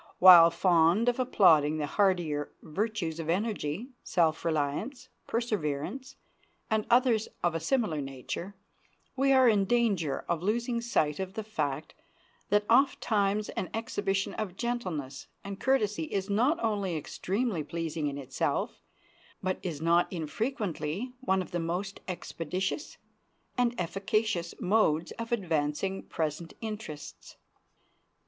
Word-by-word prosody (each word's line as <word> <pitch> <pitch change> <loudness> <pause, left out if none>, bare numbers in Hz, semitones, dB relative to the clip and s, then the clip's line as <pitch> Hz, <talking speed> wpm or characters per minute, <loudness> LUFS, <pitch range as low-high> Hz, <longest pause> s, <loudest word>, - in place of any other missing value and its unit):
While 175 -2 +10
fond 170 +5 +3
of 245 +1 -1
applauding 160 - +4
the 150 - -1
hardier 165 -5 +1
virtues 175 -1 -2
of 165 -1 -4
energy, 200 - -1
self 160 -3 +1
reliance, 165 - -2 0.2
perseverance, 225 - -2 0.6
and 220 -1 +1
others 240 -3 +4 0.2
of 175 - +2
a 165 - -1
similar 165 - 0
nature, 135 +8 -6 0.6
we 275 +1 +3
are 260 -1 +6
in 205 -4 +4
danger 195 - +1
of 170 -2 -1
losing 235 +4 0
sight 155 -11 0
of 190 0 -4
the 220 - -3
fact 155 -8 -3 0.6
that 205 0 +3
ofttimes 215 -5 +2
an 185 - -4
exhibition 200 -3 -1
of 195 -4 -4
gentleness 180 - -3 0.2
and 195 0 -6
courtesy 210 -10 +1
is 195 +4 -3
not 250 +11 +2
only 200 -6 0
extremely 190 - -2
pleasing 160 -1 -3
in 140 -1 -3
itself, 135 -2 -2 0.6
but 185 0 -1
is 160 -5 -4
not 170 +1 +3
infrequently 190 - -3
one 190 -8 +1
of - - -14
the 175 - -1
most 180 +4 -3
expeditious 185 - -4 0.6
and 245 -1 +1
efficacious 195 0 -1
modes 175 -5 +2
of 230 0 -5
advancing 180 -2 -1
present 160 +1 -4
interests. 210 -9 -7
190 Hz, 125 wpm, -29 LUFS, 160-220 Hz, 0.6 s, While